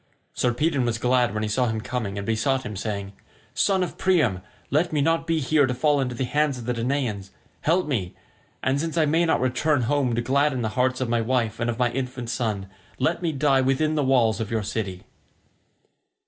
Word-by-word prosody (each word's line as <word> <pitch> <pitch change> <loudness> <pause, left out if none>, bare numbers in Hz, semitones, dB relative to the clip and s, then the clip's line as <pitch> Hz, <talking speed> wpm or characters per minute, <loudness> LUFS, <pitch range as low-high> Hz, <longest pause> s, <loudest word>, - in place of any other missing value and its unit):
Sarpedon 130 +3 +1
was 120 -2 0
glad 125 -1 +2
when 110 +1 -2
he 110 - -1
saw 125 +4 +1
him 110 -1 -1
coming, 110 -4 -4
and 100 - -4
besought 130 +5 0
him, 105 - -6
saying, 100 0 -4 0.4
"Son 190 -2 +2
of 180 - -6
Priam, 150 - +2 0.3
let 155 +5 +2
me 155 - 0
not 165 +3 +1
be 165 -1 +1
here 145 0 +3
to 125 - -2
fall 145 +2 +2
into 125 -2 -2
the 130 - -2
hands 145 +1 +1
of 120 - -8
the 125 - 0
Danaans. 115 -5 -2 0.3
Help 175 +4 +2
me, 105 -12 -2 0.5
and 135 +2 +1
since 165 0 -3
I 160 - +4
may 165 +3 +2
not 160 - +2
return 130 +2 +1
home 125 -1 +1
to 120 - 0
gladden 135 0 +1
the 110 - 0
hearts 130 +3 0
of 130 - 0
my 120 -1 +1
wife 115 -2 0
and 120 0 0
of 115 - -2
my 125 -1 +1
infant 125 -2 -4
son, 110 -6 -2 0.3
let 170 +2 0
me 170 -2 0
die 140 -2 +2
within 135 +4 +1
the 150 -2 +1
walls 120 -5 +3
of 110 -2 -3
your 110 -2 -1
city." 95 -3 -4
125 Hz, 215 wpm, -24 LUFS, 115-145 Hz, 0.5 s, I